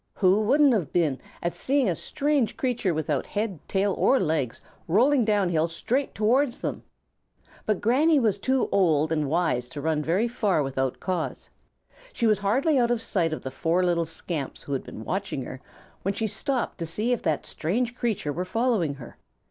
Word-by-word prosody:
Who 195 +1 +3
wouldn't 275 +5 +4
have 190 -9 -1
been 155 -7 +1 0.2
at 170 - -1
seeing 275 -2 +1
a 175 - +1
strange 280 - 0
creature 245 -7 0
without 155 -3 -1
head, 205 -5 -3
tail, 195 0 +1
or 265 - +4
legs 155 -8 -1 0.3
rolling 245 - +4
down 205 -4 +2
hill 165 -1 +2
straight 245 +11 -2
towards 240 +5 +2
them? - - -3 0.9
But 215 -3 +1
Granny 290 +7 +4
was 215 -5 +1
too 260 +4 +1
old 160 -5 +3
and 155 -3 0
wise 155 -7 0
to 150 - -7
run 155 +1 0
very 180 +10 +1
far 210 -9 +1
without 135 -1 -2
cause. 180 -3 -3 0.6
She 235 - -1
was 215 -2 +3
hardly 265 +9 +2
out 240 -1 +3
of 240 -1 +1
sight 175 -7 0
of 155 - -4
the 130 - -5
four 170 +6 +1
little 170 -1 +1
scamps 160 -3 -5
who 140 - -5
had 135 - -2
been 110 - -9
watching 190 -8 -2
her 130 +1 -8 0.4
when 195 +1 -1
she 225 +1 -1
stopped 250 +4 -2
to 165 - -3
see 215 +9 -1
if 245 - 0
that 160 -4 -1
strange 240 +9 -1
creature 220 - -1
were 180 - -2
following 210 - 0
her. 125 -4 -12
195 Hz, 190 wpm, -26 LUFS, 160-235 Hz, 0.9 s, wouldn't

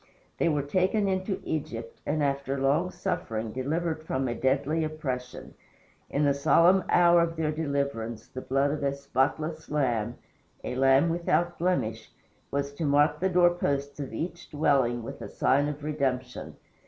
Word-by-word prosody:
They - - +3
were 150 -3 0
taken 185 +7 +1
into 190 0 -1
Egypt, 115 -7 -5
and, 150 0 0
after 140 -1 -1
long 145 +7 +2
suffering, 110 -9 -3
delivered 160 +6 -2
from 135 -4 -2
a 120 - -1
deadly 140 +6 0
oppression. 135 -5 -5 0.6
In 145 - 0
the 140 - +4
solemn 165 +6 +4
hour 175 -1 +6
of 165 0 0
their 160 -2 0
deliverance 140 -7 -3
the 130 - -7
blood 135 +2 +1
of 150 - -3
a 140 0 0
spotless 140 +4 -1
lamb 120 -6 0 0.5
"a - - -3
lamb 135 +4 +4
without 175 +1 0
blemish" 115 -11 -1 0.4
was 140 0 -2
to 160 - -5
mark 145 0 +3
the 190 - +1
door 175 -1 +5
posts 140 -4 -2
of 140 -2 -5
each 170 +8 -5
dwelling 135 -6 +1
with - - -8
a - - -6
sign 140 +2 +2
of 150 0 -5
redemption. 130 -4 -2
145 Hz, 160 wpm, -28 LUFS, 130-165 Hz, 0.6 s, hour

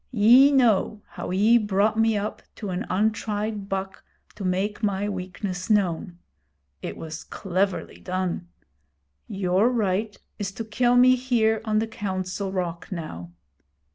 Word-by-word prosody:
Ye 245 +5 +7
know 220 -5 +2
how - - -6
ye 210 +6 +4
brought 205 0 +1
me 225 -1 +3
up 205 +1 -4
to 205 -3 -5
an 185 +6 -3
untried 210 0 -1
buck 195 0 -4 0.3
to 205 - -8
make 190 +4 -1
my 205 -1 0
weakness 185 0 -5
known. 180 -4 +1 0.6
It - - -5
was 160 0 -7
cleverly 190 0 -2
done. 185 -1 -3 0.8
Your 195 +2 +2
right 210 -3 -1 0.2
is 200 -1 -2
to 225 - -5
kill 240 +3 +2
me 255 +1 +7
here 230 -4 +1
on 215 -1 +1
the 220 - +2
Council 190 -3 -3
Rock, 175 -2 -4
now. 90 - -6
205 Hz, 140 wpm, -25 LUFS, 185-220 Hz, 0.8 s, Ye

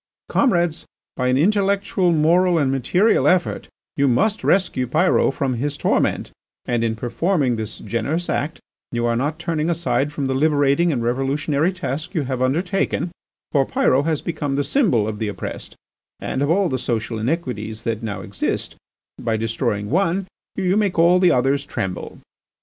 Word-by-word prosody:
"Comrades, 175 - +1 0.3
by 125 - -1
an 125 +1 +3
intellectual, 195 +1 +2
moral 170 +3 +3
and 140 -4 +2
material 175 - +2
effort 180 -2 +1 0.3
you 140 0 +2
must 205 - +1
rescue 175 -9 +1
Pyrot 155 +1 +2
from 135 -2 -1
his 140 +4 -3
torment, - - 0 0.3
and 120 -1 0
in 115 -1 0
performing 125 - 0
this 110 -1 -5
generous 145 +10 -2
act 155 +3 -2 0.3
you 120 0 -1
are 120 0 +1
not 145 +6 -1
turning 165 -1 -1
aside 165 -4 0
from 145 -2 -3
the 135 - 0
liberating 145 +3 +2
and 120 -5 -1
revolutionary 140 +6 0
task 170 -1 -5
you 155 - +1
have 130 -1 -3
undertaken, 175 +6 0 0.4
for 140 -3 +3
Pyrot 135 +2 +1
his 155 -3 0
become 145 -4 -2
the 145 - +1
symbol 140 - +2
of 105 -1 -4
the 110 - -1
oppressed 105 - -6 0.4
and 130 - -3
of 145 - +1
all 190 +3 +3
the 130 -5 -2
social 115 -2 -2
iniquities 110 -5 -3
that 115 -1 -2
now 110 -4 -4
exist; - - -3 0.4
by 115 -2 -1
destroying 110 -1 -2
one 185 +2 +1 0.3
you 190 -1 +1
make 205 -4 +1
all 170 +2 +5
the 180 -1 +5
others 135 +3 +2
tremble." 95 -9 -5
145 Hz, 165 wpm, -21 LUFS, 125-175 Hz, 0.4 s, all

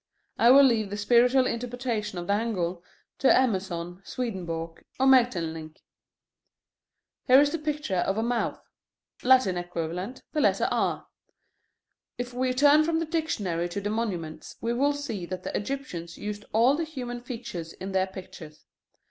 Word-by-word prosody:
I 235 - +6
will 275 +2 +9
leave 225 -6 +3
the 205 - -4
spiritual 245 +5 +4
interpretation 235 -4 -3
of 175 - -4
the 200 - +1
angle 185 -6 -2 0.4
to 270 - +5
Emerson, 185 -7 0
Swedenborg, 170 -8 -5 0.2
or 265 - +3
Maeterlinck. 165 -12 +2 1.5
Here 260 +1 +8
is 290 0 +4
the 330 - -2
picture 295 -10 -2
of 195 +3 0
a 220 - +1
mouth: 235 0 -1 0.6
Latin 255 -8 +4
equivalent, 175 +6 -5
the 305 - +1
letter - - +3
R. - - 0 1.1
If 245 0 -5
we 255 +1 0
turn 290 +4 +5
from 325 +1 0
the 330 - -1
dictionary 205 - -2
to 200 - -3
the 205 +1 -3
monuments, 185 -8 -4
we 230 +1 -1
will 280 +4 +2
see 230 -11 -5
that 185 0 -6
the - - -4
Egyptians 205 -9 -4
used 210 0 -6
all 235 +6 +4
the 330 - -1
human 250 -6 -6
features 230 -10 -7
in 190 +1 -7
their 190 0 +1
pictures. 180 -5 -11
225 Hz, 155 wpm, -27 LUFS, 180-260 Hz, 1.5 s, will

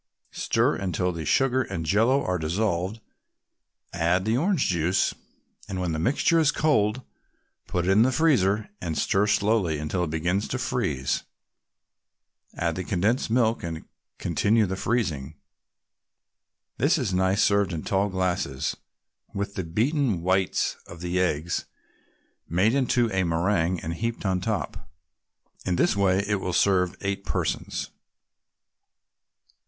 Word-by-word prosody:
Stir - - +1
until 90 -1 -1
the 85 -2 -5
sugar 130 - +2
and 95 -9 -4
Jello 115 - +3
are 90 -1 0
dissolved, 95 +4 -1 0.9
add 85 +2 +1
the 110 +1 +1
orange 170 +3 +1
juice, 90 +1 +1 0.6
and 95 -2 -3
when 90 -2 -1
the 80 - -2
mixture 145 - +2
is 155 -3 +4
cold, 125 -5 +1 0.6
put 90 -1 -1
it 95 - +3
in 100 +3 +5
the 130 +3 +4
freezer 110 - +2
and 80 -3 -3
stir 100 +2 +2
slowly 105 -6 +2
until 75 +4 -2
it 85 - -2
begins 85 +6 -1
to - - -2
freeze. 65 0 -1 1.4
Add 85 -1 -1
the 95 - -2
condensed 105 +8 0
milk, 115 -1 +2
and 80 -1 -6 0.3
continue 110 +1 +2
the 95 0 -3
freezing. 85 - -2 1.4
This 145 +7 +3
is 120 -10 -1
nice 95 +2 +2
served 100 -2 +2
in 80 -2 -4
tall 100 +1 +1
glasses, 90 -6 -1 0.6
with 100 0 -3
the 95 - -3
beaten 110 - 0
whites 95 +1 +1
of 85 -1 -11
the 90 +1 -1
eggs 85 -2 0 0.8
made 95 +7 +2
into 125 -4 +2
a 95 - +1
meringue 85 +1 +1
and 80 +1 -4
heaped 115 +5 -3
on 95 -1 +1
top. 105 -8 -3 0.7
In 90 - 0
this 85 - +2
way 100 -1 +2
it 105 -2 0
will 90 - -3
serve 90 0 +2
eight 100 0 -2
persons. - - -2
95 Hz, 140 wpm, -26 LUFS, 85-110 Hz, 1.4 s, in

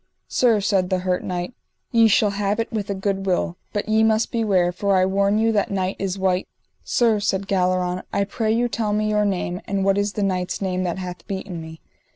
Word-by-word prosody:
Sir, 230 -4 +3
said 195 -3 +1
the 185 - +1
hurt 180 -1 0
knight, 180 +4 -3 0.4
ye 230 -1 +5
shall 210 0 +3
have 205 +1 -1
it 230 - -2
with 210 -3 -3
a 200 - -1
good 195 0 -2
will; 180 -1 0
but 205 - -2
ye 220 0 +3
must 220 0 +2
beware, 195 -6 +2
for 195 +2 0
I 185 - +4
warn 200 +2 +2
you 225 +1 +3
that 210 -2 +1
knight 190 -1 -1
is 195 -1 -2
wight. 190 -1 0 0.4
Sir, 230 -3 +2
said 195 -1 -1
Galleron, 185 -1 +1
I 200 - +1
pray 215 +2 -1
you 235 +2 +2
tell 215 -2 -1
me 215 0 +1
your 210 0 +2
name, 180 -2 -2
and 195 -1 -1
what 195 0 +3
is 205 0 -1
that 205 - -1
knight's 185 -2 -1
name 185 -2 -1
that 175 0 -2
hath 180 -1 -7
beaten 190 -3 -5
me. 160 0 -10
195 Hz, 220 wpm, -22 LUFS, 185-210 Hz, 0.4 s, ye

